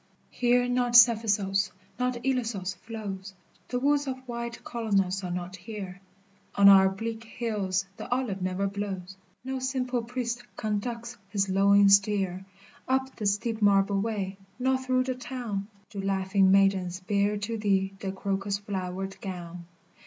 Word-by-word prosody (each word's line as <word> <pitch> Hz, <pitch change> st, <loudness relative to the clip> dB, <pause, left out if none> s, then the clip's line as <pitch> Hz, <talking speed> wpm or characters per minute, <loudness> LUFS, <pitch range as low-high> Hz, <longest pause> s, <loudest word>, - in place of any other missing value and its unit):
Here 245 Hz, 0 st, +2 dB
not 245 Hz, -1 st, +1 dB
Cephissos, 210 Hz, -4 st, +5 dB, 0.3 s
not 250 Hz, 0 st, 0 dB
Ilissos 225 Hz, -8 st, -1 dB
flows, 200 Hz, -2 st, -7 dB, 0.3 s
The 250 Hz, -, -2 dB
woods 285 Hz, +1 st, +2 dB
of 260 Hz, -1 st, -2 dB
white 235 Hz, -1 st, -5 dB
Colonos 200 Hz, -5 st, 0 dB
are 180 Hz, -, -3 dB
not 180 Hz, +1 st, -4 dB
here, 190 Hz, -1 st, -8 dB, 0.5 s
On 200 Hz, 0 st, +7 dB
our 190 Hz, -1 st, +8 dB
bleak 225 Hz, +3 st, -5 dB
hills 210 Hz, -5 st, -2 dB
the -, -, -8 dB
olive 245 Hz, -7 st, -1 dB
never 185 Hz, +2 st, -1 dB
blows, 195 Hz, -2 st, -4 dB, 0.3 s
No 265 Hz, 0 st, -3 dB
simple 255 Hz, -1 st, -1 dB
priest 240 Hz, 0 st, -3 dB, 0.2 s
conducts 235 Hz, +3 st, -3 dB
his 200 Hz, -1 st, 0 dB
lowing 200 Hz, +1 st, +5 dB
steer 195 Hz, -2 st, +3 dB, 0.4 s
Up 265 Hz, 0 st, 0 dB
the 210 Hz, -, -2 dB
steep 220 Hz, +3 st, -1 dB
marble 195 Hz, -1 st, +4 dB
way, 200 Hz, -3 st, -3 dB, 0.2 s
nor 260 Hz, +1 st, +2 dB
through 255 Hz, -1 st, +1 dB
the 255 Hz, 0 st, -2 dB
town 245 Hz, -6 st, -5 dB, 0.2 s
Do 200 Hz, -3 st, -4 dB
laughing 195 Hz, 0 st, +2 dB
maidens 190 Hz, -2 st, +3 dB
bear 200 Hz, +2 st, +1 dB
to 220 Hz, +2 st, -3 dB
thee 195 Hz, -2 st, +1 dB
the 195 Hz, -1 st, -3 dB
crocus 195 Hz, +1 st, -2 dB
flowered 190 Hz, -1 st, -5 dB
gown. 175 Hz, -3 st, -7 dB
200 Hz, 145 wpm, -28 LUFS, 195-235 Hz, 0.5 s, our